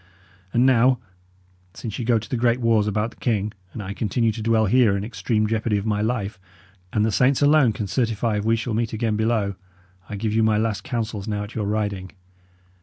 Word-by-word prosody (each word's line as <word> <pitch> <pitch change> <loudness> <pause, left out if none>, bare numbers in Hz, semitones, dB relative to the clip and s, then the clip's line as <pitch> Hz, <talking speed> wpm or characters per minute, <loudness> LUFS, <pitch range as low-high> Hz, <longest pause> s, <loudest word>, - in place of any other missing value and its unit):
And 120 +2 +3
now, 130 0 +4 0.8
since 110 0 -6
ye - - -2
go 115 -1 +3
to 110 - -5
the - - -2
great 120 +1 +2
wars 115 -3 +2
about 105 +2 -1
the - - -20
king, 105 -3 -1 0.2
and 105 - -6
I 95 +1 -5
continue 115 +2 0
to 110 +1 -6
dwell 110 0 +2
here 110 -2 +4
in 100 - -3
extreme 110 0 -1
jeopardy 110 0 0
of 100 - -3
my 105 -1 0
life, 110 -4 -2 0.5
and 105 0 +1
the 110 - +1
saints 130 +7 +3
alone 145 -4 +5
can 105 0 -4
certify 110 +1 0
if 105 - -2
we 115 +1 +3
shall 115 0 -3
meet 115 +1 -1
again 110 -1 0
below, 110 -2 0 0.6
I 105 - -4
give 105 +1 -2
you 110 - +3
my 110 -1 +3
last 110 -1 -1
counsels 115 -7 -3
now 105 -1 -2
at 105 - -9
your 110 -3 -2
riding. 100 -3 -2
110 Hz, 215 wpm, -23 LUFS, 105-115 Hz, 0.8 s, alone